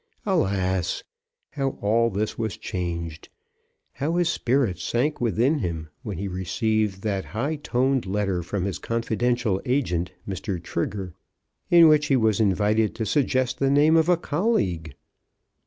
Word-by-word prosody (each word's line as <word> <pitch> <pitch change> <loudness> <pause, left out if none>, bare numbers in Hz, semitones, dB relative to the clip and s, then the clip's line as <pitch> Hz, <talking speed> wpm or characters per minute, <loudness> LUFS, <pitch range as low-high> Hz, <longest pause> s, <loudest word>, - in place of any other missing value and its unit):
Alas! 95 - 0 0.5
how 135 -2 -2
all 115 +3 +2
this 105 +1 -2
was 110 -5 -3
changed; 85 -3 -5 0.6
how 155 +5 -2
his 175 -1 +2
spirits 125 -7 0
sank 140 +5 -1
within 120 - +2
him, 80 - -4
when 100 -5 -5
he 100 +3 -3
received 95 +2 -1
that 100 -3 -1
high 140 +7 0
toned 130 -4 0
letter 95 -2 0
from 90 +2 -3
his 95 -4 -3
confidential 115 -2 0
agent, 105 -10 0 0.2
Mr. 95 0 -3
Trigger, 90 +2 -4 0.6
in 170 -1 +8
which 150 -1 +4
he 135 - +3
was 110 -4 +2
invited 105 +1 +2
to 110 - -2
suggest 130 +2 +1
the 135 - +2
name 150 +3 +5
of 160 +1 +4
a 180 - +5
colleague! 145 - -1
110 Hz, 140 wpm, -25 LUFS, 95-135 Hz, 0.6 s, in